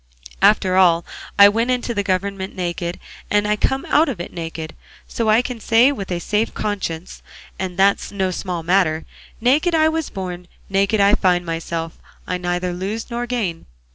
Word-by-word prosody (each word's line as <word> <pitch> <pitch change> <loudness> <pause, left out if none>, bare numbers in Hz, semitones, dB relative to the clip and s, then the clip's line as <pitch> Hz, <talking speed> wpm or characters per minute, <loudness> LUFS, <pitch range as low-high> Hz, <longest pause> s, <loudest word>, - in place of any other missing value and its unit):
After 190 -3 +4
all 170 -2 +4 0.3
I 200 - +10
went 225 +4 +1
into 250 -1 0
the 205 - 0
government 195 0 -2
naked, 175 -1 -3 0.3
and 205 0 +2
I 210 - +2
come 265 +5 -1
out 305 +1 +3
of 235 -10 -4
it 175 - -6
naked; 165 -1 -6 0.3
so 230 -2 -1
I 220 +3 +4
can 250 -2 -5
say 235 +5 +4
with 200 -9 -5
a 175 - -1
safe 210 +5 -1
conscience 190 -5 -4 0.4
and 185 -1 -4
that's 195 +1 +2
no 190 -2 -1
small 180 -2 -4
matter 165 -3 +2 0.3
'naked 290 +9 +3
I 315 0 +4
was 320 -1 -2
born, 180 -2 -6 0.2
naked 200 +2 +2
I 200 +1 +5
find 180 -3 +2
myself, 165 0 -4 0.3
I 180 - -2
neither 175 0 -2
lose 200 +7 -4
nor 240 +1 -3
gain. 210 - -3
195 Hz, 175 wpm, -20 LUFS, 175-225 Hz, 0.4 s, I